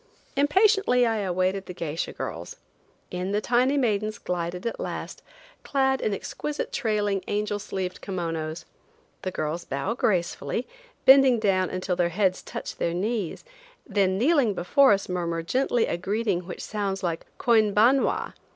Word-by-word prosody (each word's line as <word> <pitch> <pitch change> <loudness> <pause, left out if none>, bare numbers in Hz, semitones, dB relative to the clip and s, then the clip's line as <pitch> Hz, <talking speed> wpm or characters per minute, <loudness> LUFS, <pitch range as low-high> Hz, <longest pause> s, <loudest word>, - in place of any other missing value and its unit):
Impatiently 295 - +4
I 225 -1 +1
awaited 185 0 -1
the 180 - -7
geisha 165 -1 -3
girls. 90 -10 -6 0.6
In 180 +2 -3
the 210 - +2
tiny 250 +5 +2
maidens 215 -4 0
glided 180 +1 -4
at 230 - -3
last, - - -5 0.4
clad 265 -1 +1
in 215 - 0
exquisite 295 +8 -4
trailing, 210 -6 0
angel 205 0 -1
sleeved 190 -2 -4
kimonos. 165 -3 -4 0.6
The 185 - -2
girls 160 0 -3
bow 140 +11 -2
gracefully, 185 - -1 0.4
bending 265 -2 +7
down 190 -4 +1
until 185 0 -2
their 175 -1 +1
heads 185 +1 +1
touch - - -7
their 170 0 -1
knees, 205 -1 -2 0.4
then 195 -3 +1
kneeling 255 - +3
before 275 +11 +4
us 195 -1 +1
murmur 170 -2 -2
gently 245 +5 +1
a - - -2
greeting 195 -1 -1
which 180 - -6
sounds 200 -2 -3
like 170 -2 -2
"Koinbanwa!" 225 +3 +3
200 Hz, 140 wpm, -26 LUFS, 180-235 Hz, 0.6 s, bending